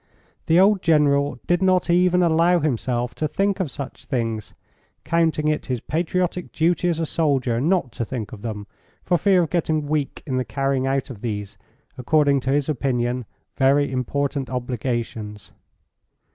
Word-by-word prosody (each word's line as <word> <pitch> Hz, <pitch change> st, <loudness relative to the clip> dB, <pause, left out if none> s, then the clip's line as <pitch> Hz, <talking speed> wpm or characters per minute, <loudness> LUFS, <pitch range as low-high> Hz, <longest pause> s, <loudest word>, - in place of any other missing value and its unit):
The 165 Hz, +2 st, +5 dB
old 195 Hz, 0 st, +4 dB
General 145 Hz, -4 st, +2 dB
did 175 Hz, +1 st, +1 dB
not 185 Hz, -1 st, +3 dB
even 180 Hz, +1 st, +3 dB
allow 170 Hz, +1 st, +4 dB
himself 125 Hz, -4 st, -1 dB
to 155 Hz, -, -2 dB
think 195 Hz, +5 st, 0 dB
of 185 Hz, -6 st, -1 dB
such 140 Hz, 0 st, -8 dB
things, 115 Hz, -5 st, -3 dB, 0.5 s
counting 160 Hz, -2 st, +1 dB
it 155 Hz, 0 st, -1 dB
his 125 Hz, -3 st, -1 dB
patriotic 175 Hz, +5 st, -2 dB
duty 175 Hz, +2 st, +1 dB
as 165 Hz, -2 st, -1 dB
a 165 Hz, -, 0 dB
soldier 135 Hz, -7 st, 0 dB
not 165 Hz, -4 st, +1 dB
to 115 Hz, -, -4 dB
think 115 Hz, -2 st, -5 dB
of 110 Hz, -5 st, -9 dB
them 105 Hz, -2 st, -5 dB, 0.4 s
for 175 Hz, -, +1 dB
fear 190 Hz, -2 st, +4 dB
of 160 Hz, -, -4 dB
getting 160 Hz, -3 st, 0 dB
weak 145 Hz, -1 st, -2 dB
in 130 Hz, -3 st, -2 dB
the 130 Hz, -, +1 dB
carrying 135 Hz, 0 st, -1 dB
out 135 Hz, 0 st, -1 dB
of 110 Hz, -5 st, -10 dB
these, 105 Hz, -4 st, -4 dB, 0.4 s
according 145 Hz, +1 st, +3 dB
to 130 Hz, -, -4 dB
his 140 Hz, 0 st, +1 dB
opinion, 125 Hz, -4 st, -1 dB, 0.3 s
very 140 Hz, +1 st, +3 dB
important 135 Hz, +2 st, -2 dB
obligations. 120 Hz, -4 st, -4 dB
140 Hz, 160 wpm, -22 LUFS, 125-165 Hz, 0.5 s, The